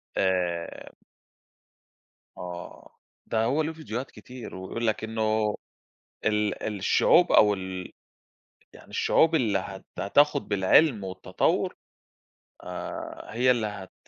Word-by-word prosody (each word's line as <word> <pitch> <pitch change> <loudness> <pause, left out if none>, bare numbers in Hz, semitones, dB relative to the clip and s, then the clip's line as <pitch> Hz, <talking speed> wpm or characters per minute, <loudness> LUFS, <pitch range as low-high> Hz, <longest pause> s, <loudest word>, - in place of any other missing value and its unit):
آآ 90 -3 -1 1.4
آه، 90 -1 -9 0.3
ده 110 -1 0
هو 135 +7 +2
له 160 +1 -2
فيديوهات 135 -5 -5
كتير، 125 -5 -10
ويقول 110 +5 -4
لك 110 0 0
إنه 110 -1 0 0.7
ال 105 -1 0
الشعوب 175 - +4
أو 105 -1 +6
ال 95 -1 -6 0.8
يعني - - -15
الشعوب 165 0 +3
اللي 110 -9 +2
هت 95 0 -8
هتاخد 145 +8 +3
بالعلم 105 +4 +4
والتطور، 95 0 -1 0.9
آآ - - -6
هي 125 +2 +4
اللي 115 -3 +1
هت 100 -2 -8
105 Hz, 105 wpm, -27 LUFS, 95-125 Hz, 1.4 s, أو